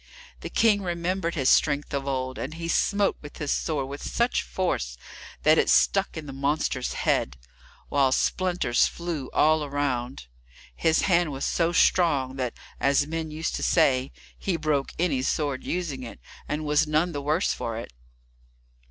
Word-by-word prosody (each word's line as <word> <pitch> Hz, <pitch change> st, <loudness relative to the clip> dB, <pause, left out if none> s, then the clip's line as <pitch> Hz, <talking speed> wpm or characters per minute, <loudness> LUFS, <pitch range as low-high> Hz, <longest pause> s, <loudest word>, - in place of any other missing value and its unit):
The -, -, -6 dB
King 210 Hz, -3 st, +3 dB
remembered 175 Hz, -1 st, -2 dB
his 135 Hz, -5 st, 0 dB
strength 145 Hz, -1 st, +2 dB
of 140 Hz, 0 st, -2 dB
old, 130 Hz, -1 st, -2 dB
and 155 Hz, +5 st, -5 dB
he 165 Hz, 0 st, -5 dB
smote 200 Hz, +4 st, +1 dB
with 145 Hz, -, -11 dB
his 150 Hz, -2 st, -2 dB
sword 145 Hz, -5 st, -2 dB
with 140 Hz, +1 st, -7 dB
such 235 Hz, +1 st, 0 dB
force 60 Hz, -, -2 dB, 0.5 s
that 155 Hz, +1 st, +5 dB
it -, -, +2 dB
stuck 195 Hz, -3 st, +3 dB
in 155 Hz, -, -6 dB
the 140 Hz, -, -8 dB
monster's 140 Hz, -2 st, -1 dB
head, 60 Hz, -, 0 dB, 0.5 s
while 135 Hz, -2 st, +2 dB
splinters 180 Hz, -5 st, +1 dB
flew 170 Hz, -6 st, -5 dB
all 155 Hz, 0 st, +3 dB
around. 135 Hz, -, -2 dB, 0.5 s
His 160 Hz, -1 st, +2 dB
hand 175 Hz, -4 st, +2 dB
was 135 Hz, 0 st, -3 dB
so 170 Hz, 0 st, +1 dB
strong 145 Hz, -7 st, +3 dB
that, 125 Hz, -3 st, -2 dB, 0.2 s
as 140 Hz, +1 st, +3 dB
men 160 Hz, +1 st, -4 dB
used 155 Hz, +1 st, -3 dB
to -, -, -5 dB
say, 135 Hz, -5 st, +2 dB, 0.3 s
he 185 Hz, -4 st, -1 dB
broke 150 Hz, -3 st, 0 dB
any 160 Hz, -7 st, +1 dB
sword 140 Hz, 0 st, -1 dB
in -, -, -7 dB
using 165 Hz, -7 st, -2 dB
it, 115 Hz, -, -9 dB, 0.3 s
and 150 Hz, +1 st, -3 dB
was 150 Hz, 0 st, +2 dB
none 155 Hz, +3 st, +1 dB
the 145 Hz, -3 st, -4 dB
worse 155 Hz, +6 st, +1 dB
for 115 Hz, -1 st, -4 dB
it. 115 Hz, -, -8 dB
150 Hz, 170 wpm, -26 LUFS, 135-170 Hz, 0.5 s, that